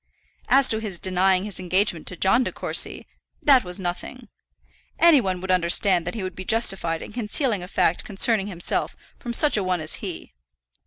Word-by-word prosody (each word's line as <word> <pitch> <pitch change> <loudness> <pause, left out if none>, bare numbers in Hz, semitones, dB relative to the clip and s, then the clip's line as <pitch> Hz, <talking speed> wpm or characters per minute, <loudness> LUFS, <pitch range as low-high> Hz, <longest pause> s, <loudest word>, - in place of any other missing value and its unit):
As 270 -1 +4
to 220 - +1
his 210 -5 -6
denying 185 0 +1
his 210 -2 -4
engagement 185 -2 0
to 180 - -2
John 195 +8 +3
De - - -4
Courcy, - - 0 0.4
that 270 -4 +5
was 180 +1 -4
nothing. 200 +6 -6 0.7
Any 335 -5 +5
one 185 -4 -3
would 190 0 -3
understand 175 0 +2
that 180 - -4
he 215 - -5
would 185 -1 -5
be 185 - -7
justified 190 -6 0
in - - -11
concealing 230 -1 -1
a 180 - -8
fact 175 -2 0
concerning 205 0 +1
himself 175 -4 0 0.2
from 240 - -6
such 290 0 +3
a 205 - 0
one 185 -1 -1
as 155 0 -1
he. - - -9
190 Hz, 190 wpm, -23 LUFS, 180-225 Hz, 0.7 s, that